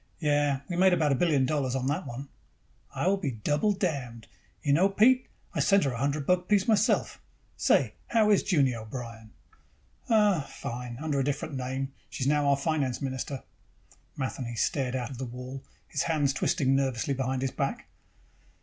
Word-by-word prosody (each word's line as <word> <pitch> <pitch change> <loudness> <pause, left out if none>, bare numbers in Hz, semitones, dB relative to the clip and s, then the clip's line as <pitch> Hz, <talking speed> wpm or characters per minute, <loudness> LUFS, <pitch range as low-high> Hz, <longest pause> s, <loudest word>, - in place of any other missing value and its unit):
"Yes. 145 -3 +1
We 175 - -3
made 185 0 +5
about 155 -4 +2
a 135 - +1
billion 150 -7 +3
dollars 135 -2 0
on 130 -1 -1
that 145 +7 -1
one." 130 +4 -6 0.7
"I - - -1
will 195 +2 +3
be 185 -8 -2
double 145 - +1
damned. 140 - -3 0.4
You 140 - +2
know, 180 +7 +4
Pete, 250 +6 +4 0.3
I - - -2
sent 200 -1 +4
her 135 - 0
a 115 - -5
hundred 140 +1 -1
buck 180 +1 +2
piece 205 -2 +3
myself. 220 +1 +2 0.3
Say, - - +2
how 220 -2 +3
is 205 - +4
Junie 140 -7 +3
O'Brien?" 115 0 -7 0.8
"Oh, 210 -5 +4
fine. 120 -3 -6
Under 150 -2 -1
a - - +2
different 145 +3 -2
name, 130 +1 -3 0.2
she's 130 - -4
now 145 0 +2
our 140 -1 +4
finance 140 -4 -1
minister." 135 0 -4 0.7
Matheny 130 -3 -3
stared 130 +1 0
out 130 +1 -3
the - - -3
wall, 125 +2 -7 0.2
his - - -2
hands 145 -4 +1
twisting 135 0 +1
nervously 135 -1 0
behind 130 0 -1
his 135 - -1
back. - - -3
140 Hz, 175 wpm, -28 LUFS, 130-170 Hz, 0.8 s, made